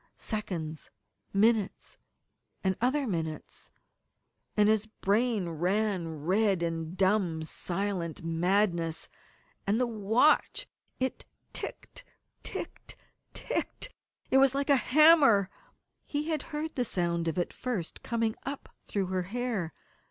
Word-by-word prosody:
Seconds, 170 -8 -4 0.4
minutes, 215 0 +2 0.7
and 190 -1 +2
other 270 +4 +2
minutes 160 -7 -4 0.9
and 210 0 +5
his 220 0 +2
brain 215 -1 +1
ran 175 -2 -1
red 195 -1 +2
in 165 0 -3
dumb, 190 -4 +2
silent 175 0 -3
madness. 170 0 +1 0.6
And 210 +4 +2
the 250 - +3
watch! 225 +5 +3 0.3
It 260 0 -2 0.3
ticked, - - -6 0.4
ticked, - - -7 0.4
ticked! - - -3 0.4
It 265 - +6
was 270 0 +5
like 280 +1 +1
a - - +8
hammer. 275 - +6 0.6
He 300 +2 -2
had 310 -3 0
heard 310 +1 -3
the 250 - 0
sound 170 -5 0
of 165 - -1
it 175 - -1
first 225 -10 -4
coming 230 -2 0
up 280 +1 -6 0.2
through 200 -2 0
her 185 0 -1
hair. 230 -7 -2
200 Hz, 115 wpm, -30 LUFS, 175-245 Hz, 0.9 s, a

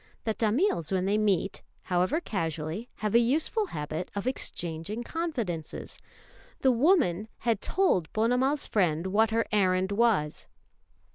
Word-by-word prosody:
The 220 - 0
Tamils 220 - +1
when 185 -1 +1
they 205 +2 +2
meet, 195 -3 0 0.2
however 185 - +1
casually, 165 - -3 0.2
have 210 - 0
a 235 - +7
useful 315 - +1
habit 155 - -4
of 200 - -3
exchanging 175 -4 -3
confidences. 235 - -4 0.6
The 265 - +5
woman 235 - +3
had 230 -4 +1
told 190 - +1
Ponnamal's 250 +6 +1
friend 170 -5 +1
what 210 +4 +3
her 225 +1 +1
errand 190 -2 +2
was. 200 -9 +1
210 Hz, 130 wpm, -28 LUFS, 180-245 Hz, 0.6 s, a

